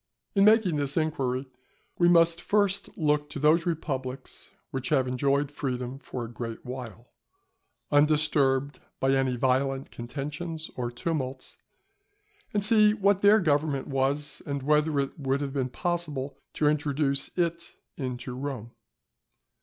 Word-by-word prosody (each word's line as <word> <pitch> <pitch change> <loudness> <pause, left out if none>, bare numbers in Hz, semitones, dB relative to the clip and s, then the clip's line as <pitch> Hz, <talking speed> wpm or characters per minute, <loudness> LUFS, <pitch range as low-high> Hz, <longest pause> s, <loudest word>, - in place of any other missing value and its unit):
In 195 -1 +4
making 215 -7 +4
this 140 +1 0
inquiry 135 -5 -1 0.5
we 175 -1 +5
must 170 -1 +4
first 200 -2 +1
look 150 -2 +1
to - - -6
those 155 +4 +3
republics 135 -6 -4 0.2
which 130 -2 -3
have 135 -4 +2
enjoyed 140 +3 +1
freedom 130 -2 -4
for 125 -4 -6
a 115 - -10
great 115 -2 -6
while, 125 -2 -8 0.8
undisturbed 145 -2 +3 0.2
by 135 - +2
any 135 -2 +2
violent 135 +2 0
contentions 150 +6 -5
or 120 -1 -2
tumults, 130 0 -4 0.9
and 205 -1 +2
see 215 -1 +6
what 200 -1 +2
their 205 +2 +6
government 145 -5 +1
was, 140 +2 -1
and 140 -2 -3
whether 150 0 +2
it 140 +2 -3
would 135 -1 0
have 140 -2 -4
been 130 -3 -1
possible 150 -4 -3 0.2
to 150 - +1
introduce 145 -2 +1
it 170 -1 -1 0.2
into 125 -2 -5
Rome. 130 -4 -5
140 Hz, 135 wpm, -27 LUFS, 130-160 Hz, 0.9 s, see